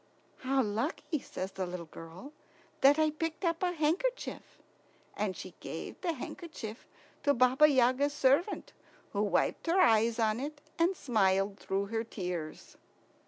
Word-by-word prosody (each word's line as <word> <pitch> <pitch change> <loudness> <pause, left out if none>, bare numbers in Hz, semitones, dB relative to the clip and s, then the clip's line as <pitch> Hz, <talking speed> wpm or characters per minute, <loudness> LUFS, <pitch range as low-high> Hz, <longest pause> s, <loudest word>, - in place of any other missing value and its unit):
"How 265 0 +1
lucky," 235 +8 -2
says 190 -6 -6
the 190 -1 -3
little 175 -1 -6
girl, 165 - -11 0.5
"that 280 +2 +6
I 310 -1 +3
picked 325 +3 -3
up 335 -1 0
a 360 -1 +2
handkerchief!" 355 +11 -1 0.6
And - - -2
she - - -8
gave - - -7
the 345 -3 0
handkerchief 260 - -7 0.3
to 285 -1 +3
Baba 255 +4 +6
Yaga's 260 +1 +3
servant, 290 +8 +2 0.4
who 200 - 0
wiped 210 +9 +1
her 345 +3 +3
eyes 225 -4 +4
on 220 -1 +1
it 290 +2 -5 0.2
and 345 +2 +3
smiled 195 -4 +1
through 195 +1 -1
her 225 0 0
tears. 180 -8 -6
260 Hz, 145 wpm, -31 LUFS, 205-310 Hz, 0.6 s, that